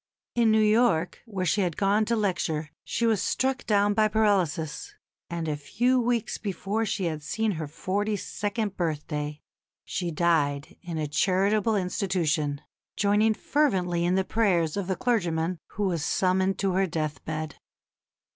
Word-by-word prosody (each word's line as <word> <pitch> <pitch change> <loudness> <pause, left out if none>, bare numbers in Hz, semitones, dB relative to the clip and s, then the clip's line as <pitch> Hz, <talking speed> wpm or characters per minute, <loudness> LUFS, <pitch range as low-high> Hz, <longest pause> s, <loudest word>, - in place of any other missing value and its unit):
In 235 -2 +3
New 220 0 +4
York, 215 -6 +2
where 195 -4 -3
she 200 +4 +2
had 175 -4 -1
gone 205 +2 +2
to 235 - +1
lecture, 165 -7 -1
she 235 - -1
was 220 -4 +2
struck 260 -1 0
down 205 -1 +3
by 215 +1 +4
paralysis, 190 -8 0 0.3
and 170 -1 -3
a 150 - 0
few 240 - +1
weeks 240 -2 0
before 210 +2 -2
she 195 -2 -1
had 155 -2 -2
seen 220 +8 -1
her 160 -4 -4
forty 205 +7 -1
second 205 +1 -3
birthday 150 -3 -3 0.4
she 175 -1 -2
died 150 -4 +1
in 175 -3 -5
a 155 - -1
charitable 195 +7 +2
institution, 175 -7 0 0.4
joining 210 +2 +3
fervently 185 - +1
in 175 +1 +2
the 190 - +2
prayers 180 -7 +1
of 200 -3 -2
the 190 - 0
clergyman 175 -6 0
who 210 - -2
was 175 -6 0
summoned 190 +2 +1
to 195 -1 0
her 190 +1 +2
death 155 -2 -3
bed. 155 0 -4
190 Hz, 155 wpm, -27 LUFS, 160-215 Hz, 0.4 s, New